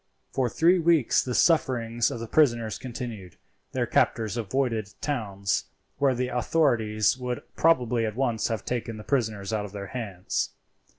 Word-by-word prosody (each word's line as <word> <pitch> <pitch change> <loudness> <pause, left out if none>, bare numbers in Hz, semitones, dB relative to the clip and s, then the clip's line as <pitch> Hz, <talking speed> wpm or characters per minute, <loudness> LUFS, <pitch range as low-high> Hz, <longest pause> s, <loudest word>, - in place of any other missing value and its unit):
For 130 -2 +1
three 175 +8 +4
weeks 165 -6 +3
the 125 -2 -3
sufferings 120 -8 +2
of 115 - -5
the 115 - -4
prisoners 115 -5 +2
continued. 115 -7 -7 0.4
Their - - 0
captors 110 -1 +1
avoided 115 -2 -1
towns, 100 -8 -1 0.3
where 135 -2 +3
the 125 +1 -1
authorities 120 -4 +2
would 125 -1 -3
probably 125 -8 +3
at 110 - -5
once 120 -4 0
have 110 -4 -3
taken 115 -2 -3
the 105 - -8
prisoners 110 -6 -1
out 105 -1 -1
of 100 - -10
their 100 -1 -6
hands. 100 -8 -3
120 Hz, 155 wpm, -26 LUFS, 110-130 Hz, 0.4 s, three